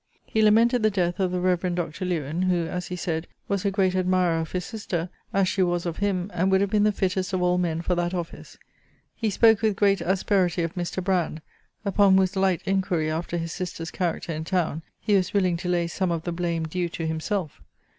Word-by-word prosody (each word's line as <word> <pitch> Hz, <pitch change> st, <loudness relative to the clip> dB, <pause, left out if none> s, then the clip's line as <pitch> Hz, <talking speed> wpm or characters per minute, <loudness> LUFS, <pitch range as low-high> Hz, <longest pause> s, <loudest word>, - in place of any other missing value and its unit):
He 220 Hz, -, 0 dB
lamented 230 Hz, +3 st, +4 dB
the 215 Hz, -, +4 dB
death 180 Hz, -3 st, -1 dB
of 190 Hz, -1 st, +2 dB
the 180 Hz, -, -1 dB
reverend 180 Hz, -1 st, +1 dB
Dr. 175 Hz, +1 st, -3 dB
Lewen, 165 Hz, -2 st, -2 dB
who, 175 Hz, -2 st, +1 dB
as 180 Hz, +2 st, -4 dB
he 180 Hz, -, -4 dB
said, 165 Hz, -1 st, -3 dB, 0.2 s
was 200 Hz, -2 st, -1 dB
a -, -, +4 dB
great 190 Hz, -2 st, +1 dB
admirer 185 Hz, -2 st, +2 dB
of 160 Hz, -1 st, -4 dB
his 180 Hz, -1 st, -2 dB
sister, 185 Hz, -6 st, -4 dB, 0.2 s
as 195 Hz, -1 st, +2 dB
she 190 Hz, -, 0 dB
was 175 Hz, -1 st, +1 dB
of 170 Hz, -2 st, -3 dB
him, 200 Hz, -1 st, -1 dB
and 180 Hz, +2 st, +1 dB
would 190 Hz, 0 st, +4 dB
have 200 Hz, 0 st, 0 dB
been 210 Hz, -1 st, +3 dB
the 215 Hz, -, +4 dB
fittest 190 Hz, -1 st, -1 dB
of 185 Hz, -1 st, +1 dB
all 180 Hz, 0 st, +2 dB
men 165 Hz, -2 st, -1 dB
for 180 Hz, -, 0 dB
that 175 Hz, 0 st, 0 dB
office. 175 Hz, -2 st, -6 dB, 0.6 s
He 225 Hz, -, -1 dB
spoke 220 Hz, +1 st, +4 dB
with 215 Hz, -2 st, +2 dB
great 200 Hz, -2 st, +3 dB
asperity 185 Hz, -1 st, +1 dB
of 165 Hz, -, -3 dB
Mr. 175 Hz, +1 st, -3 dB
Brand, 180 Hz, -4 st, 0 dB, 0.5 s
upon 200 Hz, -1 st, +4 dB
whose 190 Hz, 0 st, +2 dB
light 190 Hz, -2 st, +1 dB
inquiry 185 Hz, -5 st, 0 dB
after 170 Hz, +2 st, -3 dB
his 165 Hz, 0 st, -3 dB
sister's 170 Hz, -3 st, -5 dB
character 175 Hz, -2 st, -2 dB
in 155 Hz, +1 st, -4 dB
town 165 Hz, -3 st, -1 dB, 0.2 s
he 210 Hz, -, 0 dB
was 190 Hz, 0 st, +2 dB
willing 185 Hz, -3 st, +3 dB
to 180 Hz, +1 st, -4 dB
lay 175 Hz, -1 st, +1 dB
some 185 Hz, +2 st, -1 dB
of 165 Hz, -1 st, -2 dB
the 175 Hz, -, -3 dB
blame 170 Hz, -1 st, -1 dB
due 175 Hz, +1 st, -2 dB
to 165 Hz, 0 st, -4 dB
himself. 160 Hz, +1 st, -3 dB
180 Hz, 225 wpm, -25 LUFS, 170-195 Hz, 0.6 s, lamented